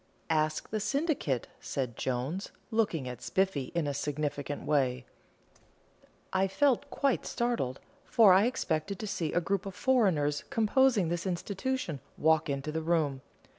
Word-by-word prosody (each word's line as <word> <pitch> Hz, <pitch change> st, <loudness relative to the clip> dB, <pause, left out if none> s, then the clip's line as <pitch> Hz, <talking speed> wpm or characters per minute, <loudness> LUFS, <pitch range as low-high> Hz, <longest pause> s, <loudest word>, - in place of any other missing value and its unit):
"Ask 155 Hz, -1 st, 0 dB
the 215 Hz, -, 0 dB
syndicate," 275 Hz, -, 0 dB
said 125 Hz, -4 st, -3 dB
Jones, 130 Hz, -, -2 dB, 0.2 s
looking 200 Hz, -, +1 dB
at 125 Hz, -1 st, -6 dB
Spiffy 190 Hz, -8 st, 0 dB
in 170 Hz, -3 st, +1 dB
a 145 Hz, -, -1 dB
significant 145 Hz, 0 st, -3 dB
way. 130 Hz, -4 st, +1 dB, 1.3 s
I 190 Hz, +1 st, +3 dB
felt 280 Hz, +6 st, +2 dB
quite 275 Hz, -3 st, +1 dB
startled, 235 Hz, -, -1 dB, 0.2 s
for 215 Hz, -5 st, +6 dB
I 195 Hz, +5 st, +5 dB
expected 195 Hz, -6 st, -1 dB
to 215 Hz, -, -5 dB
see 170 Hz, -6 st, -2 dB
a -, -, +2 dB
group 195 Hz, +3 st, -1 dB
of 195 Hz, -, -7 dB
foreigners 185 Hz, -, +2 dB
composing 225 Hz, -4 st, +3 dB
this 175 Hz, +2 st, -2 dB
institution 190 Hz, -, -2 dB, 0.2 s
walk 160 Hz, 0 st, +3 dB
into 140 Hz, +2 st, -2 dB
the 160 Hz, +1 st, -2 dB
room. 155 Hz, -5 st, +1 dB
170 Hz, 140 wpm, -30 LUFS, 145-215 Hz, 1.3 s, for